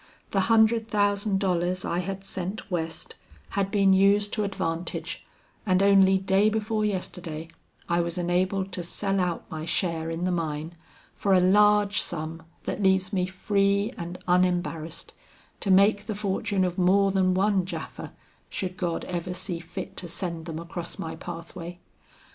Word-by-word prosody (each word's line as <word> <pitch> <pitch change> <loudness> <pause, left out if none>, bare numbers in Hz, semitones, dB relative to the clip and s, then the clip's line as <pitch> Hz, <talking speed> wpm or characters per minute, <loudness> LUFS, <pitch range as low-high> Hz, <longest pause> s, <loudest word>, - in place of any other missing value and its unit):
The 195 - +2
hundred 225 +2 +4
thousand 205 -1 +1
dollars 180 -1 0
I 170 - -1
had 195 +1 -4
sent 190 +2 -5
West, 165 -2 -3 0.4
had 195 -1 -1
been 195 -1 +4
used 200 +2 +4
to 215 - 0
advantage, 170 -4 -3 0.4
and 185 -2 +3
only 195 -1 +6
day 195 +2 +3
before 215 0 -1
yesterday 175 -5 -3 0.4
I 170 0 +2
was 170 0 -3
enabled 185 +2 0
to 180 - -3
sell 195 +3 -1
out 180 -2 -1
my 155 -1 -4
share 165 -1 -1
in 165 +1 -3
the 185 - +1
mine, 160 -1 -2 0.4
for 200 - +1
a - - +6
large 205 +2 +4
sum 160 -1 -5 0.2
that - - -3
leaves 190 0 +3
me 185 -2 +1
free 200 +2 +1
and 175 +1 -6
unembarrassed, 175 -3 0 0.5
to 200 - -2
make 200 +2 +4
the 215 - -2
fortune 200 -1 0
of 180 0 -2
more 195 +2 +4
than 185 -1 +2
one 195 0 +2
Japha, 170 -3 -6 0.4
should 185 -1 -4
God 175 -4 -2
ever 180 0 -3
see 180 -2 -3
fit 175 +1 -7
to 175 - -4
send 170 -1 -4
them 160 -1 -4
across 170 +1 -6
my 160 - -5
pathway. 170 0 -8
185 Hz, 160 wpm, -26 LUFS, 175-200 Hz, 0.5 s, only